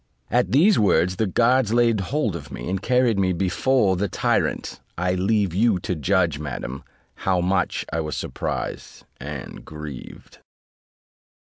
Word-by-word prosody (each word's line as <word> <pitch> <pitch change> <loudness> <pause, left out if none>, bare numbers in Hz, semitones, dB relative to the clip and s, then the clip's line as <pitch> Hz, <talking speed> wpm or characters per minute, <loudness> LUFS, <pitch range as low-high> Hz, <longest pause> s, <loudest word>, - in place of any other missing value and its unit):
At 125 +1 +2
these 180 +9 +5
words 90 -3 +2
the 110 - +1
guards 120 +3 +2
laid 115 -2 +3
hold 110 - -1
of 75 -4 -8
me, - - -6
and 95 0 -2
carried 125 -2 +2
me 95 -1 +2
before 95 +4 +2
the 100 +3 -1
tyrant: - - -1 0.2
I 90 +1 0
leave 95 0 +1
you 105 +1 +3
to 90 - -2
judge, 85 -2 +1
madam, 70 -3 -5 0.3
how 95 -2 0
much 90 0 0
I 80 - 0
was 75 -2 -4
surprised - - -5
and 70 0 -7
grieved. 75 -4 -10
95 Hz, 145 wpm, -23 LUFS, 85-115 Hz, 0.3 s, these